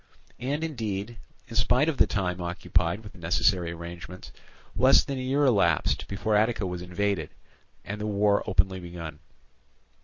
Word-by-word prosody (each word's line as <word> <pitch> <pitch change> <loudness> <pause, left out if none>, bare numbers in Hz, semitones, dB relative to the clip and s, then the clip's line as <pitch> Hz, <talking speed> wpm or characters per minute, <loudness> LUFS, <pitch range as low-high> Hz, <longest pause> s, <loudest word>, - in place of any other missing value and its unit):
And 140 +5 -2
indeed, 115 -7 -4 0.3
in - - -9
spite 130 +5 +3
of 160 -4 0
the - - +5
time 90 -3 -1
occupied 85 +2 -1
with 105 - -10
the - - -15
necessary 85 +1 +2
arrangements, 85 +1 -9 0.4
less 130 +2 +6
than 135 -2 -4
a - - -3
year 135 +3 +1
elapsed 100 - +2
before 105 +2 -1
Attica 110 -1 +2
was 90 -1 -4
invaded, 90 -2 -1 0.6
and 105 +1 -5
the 105 - -2
war 100 0 +2
openly 95 -1 +2
begun. 85 -4 -8
100 Hz, 155 wpm, -27 LUFS, 90-115 Hz, 0.6 s, less